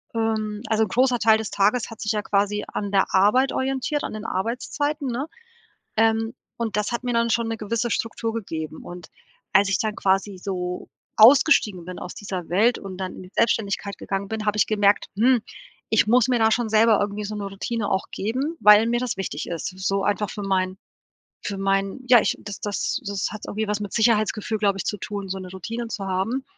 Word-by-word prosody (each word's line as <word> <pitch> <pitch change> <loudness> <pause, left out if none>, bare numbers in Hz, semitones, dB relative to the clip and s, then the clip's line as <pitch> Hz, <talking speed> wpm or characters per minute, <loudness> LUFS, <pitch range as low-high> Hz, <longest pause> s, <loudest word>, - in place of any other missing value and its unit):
ähm 220 -2 -1
also 220 0 +2
'n 215 - -2
großer 250 +2 +2
Teil 220 -1 +5
des 220 - -5
Tages 210 +4 +1
hat 225 - -10
sich 210 - 0
ja 210 - 0
quasi 205 +1 0
an 205 -1 -3
der 195 -1 +3
Arbeit 210 +8 +4
orientiert, 270 +3 -1
an - - -4
den 215 0 -6
Arbeitszeiten, 275 - -2
ne? 245 +4 -2 0.7
Ähm, 225 0 +2 0.3
und 225 -3 -2
das 210 +2 -1
hat 235 - -2
mir 245 - -1
dann 235 0 +2
schon 230 +1 +1
'ne 225 - -2
gewisse 230 +3 -2
Struktur 230 +1 -2
gegeben, 160 -8 -5
und 175 -1 -9 0.4
als 195 0 +5
ich 190 - +1
dann 215 -1 -1
quasi 195 0 0
so 180 -1 -4 0.3
ausgestiegen 220 - +6
bin 185 - -7
aus 180 - -7
dieser 190 -4 -6
Welt 220 +7 +3
und 190 -2 -8
dann 185 -1 -4
in - - -9
die 180 - -14
Selbstständigkeit 200 -3 0
gegangen 195 0 -3
bin, 215 0 -4
habe 210 - +1
ich 200 - +4
gemerkt: 205 -1 +2
„Hm, 240 +2 +4 0.5
ich 220 - +4
muss 245 +1 +5
mir 250 -2 +2
da 220 0 +4
schon 235 0 +1
selber 220 0 +5
irgendwie 205 +1 -2
so 210 +1 -5
'ne 205 - -4
Routine 205 +2 -3
auch 190 - 0
geben, 260 +11 -2
weil 210 +2 +7
mir 240 0 +1
das 250 -2 -2
wichtig 190 -6 -4
ist“, 170 -2 -3
so 195 +1 0
einfach 205 0 0
für 205 - -6
meinen 185 -1 0 0.7
für 200 - -4
meinen 195 +5 -1
ja 245 -2 +8
ich, - - 0
das 205 -1 -8
das 205 -1 -2
das 200 -1 -1
hat 215 - -8
irgendwie 220 +1 -2
was 210 0 -1
mit 205 -2 -5
Sicherheitsgefühl, 215 -1 +1
glaube 200 -2 +2
ich, - - -3
zu 210 - -2
tun, 200 0 -5
so 190 - -3
'ne 185 -1 -8
Routine 230 +6 -5
zu 210 -3 -5
haben. 195 +8 -1
210 Hz, 210 wpm, -24 LUFS, 195-230 Hz, 0.7 s, ja